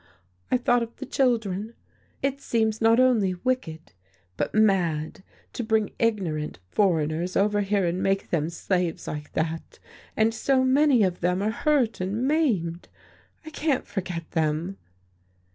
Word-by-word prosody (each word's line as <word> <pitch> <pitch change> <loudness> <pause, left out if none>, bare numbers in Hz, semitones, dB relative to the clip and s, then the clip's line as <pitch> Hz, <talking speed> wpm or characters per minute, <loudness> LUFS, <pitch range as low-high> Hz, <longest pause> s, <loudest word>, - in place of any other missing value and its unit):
I - - +3
thought 245 0 +2
of 230 0 -5
the - - -7
children. 225 -5 0 0.5
It 275 0 -1
seems 220 -1 0
not 225 +1 +5
only 225 -8 +3
wicked, 175 - -3 0.4
but - - -2
mad 180 -8 +1 0.3
to 240 - -3
bring 220 -2 +1
ignorant 180 - -1
foreigners 170 -2 +1
over 205 +1 +2
here 200 -1 +1
and 175 +2 -1
make 195 0 0
them 160 -2 0
slaves 180 -1 -2
like 150 -1 -6
that, 160 0 -3 0.4
and 220 +1 +3
so 260 +3 +2
many 260 -2 +4
of 180 -2 0
them 180 +2 0
are 215 - +1
hurt 245 -3 +1
and 210 +7 -1
maimed. 210 - 0 0.6
I 315 - -8
can't 300 -3 0
forget 180 -4 -5
them." 160 +4 -1
205 Hz, 145 wpm, -25 LUFS, 175-235 Hz, 0.6 s, not